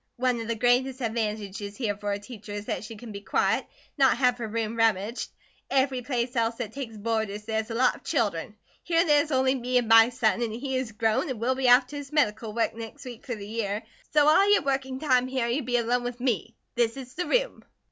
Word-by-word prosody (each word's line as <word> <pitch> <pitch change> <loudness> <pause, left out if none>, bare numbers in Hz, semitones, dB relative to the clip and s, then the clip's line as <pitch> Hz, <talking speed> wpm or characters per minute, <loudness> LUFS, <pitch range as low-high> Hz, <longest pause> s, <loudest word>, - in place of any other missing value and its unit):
One 250 -1 +1
of 225 - -6
the 230 - -1
greatest 250 +3 +2
advantages 210 -3 -3
here 215 -6 -1
fer 205 0 -3
a - - -1
teacher 210 -1 -10
is 205 0 -5
that - - -3
she 225 +1 -8
can 220 +1 -10
be 200 -1 -7
quiet, 190 - +1
an' - - -15 0.3
not 265 -1 +5
have 250 -2 +2
her 230 - -3
room 225 0 -2
rummaged. 225 0 +1 0.4
Every 265 -1 +1
place 245 0 -2
else 230 0 +1
that 230 -3 -5
takes 245 -6 -6
boarders 215 -1 -2
there's 220 0 -2
a 225 - -4
lot 250 +2 +3
of - - -21
children; 205 -3 -1 0.3
here 335 0 +2
there 295 -2 +5
is 305 - -5
only 260 -1 +3
me 250 -1 0
and 245 -2 +1
my 225 +1 +7
son, 240 -2 +1
and 235 -2 -1
he 265 +3 -3
is 255 -3 -2
grown, 220 +5 +1
and 255 -4 -4
will 245 +3 +1
be 260 -1 +1
off 250 +2 +7
to 290 +3 -8
his 285 -1 -8
medical 225 -7 +1
work 230 +1 0
next 230 +5 -9
week 245 0 -10
fer 245 - -2
the 205 -2 -8
year, 215 -1 -3 0.3
so 300 -1 +4
all 390 +7 +5
your 410 - +4
working 265 -1 -1
time 255 -4 +2
here, 260 -2 -1
you'd 245 +2 -1
be 245 -1 +2
alone 240 +1 +1
with 245 0 -5
me. 235 -2 -1 0.2
This 235 0 +1
is 255 -2 -9
the 360 - -3
room." - - 0
240 Hz, 240 wpm, -27 LUFS, 220-260 Hz, 0.4 s, my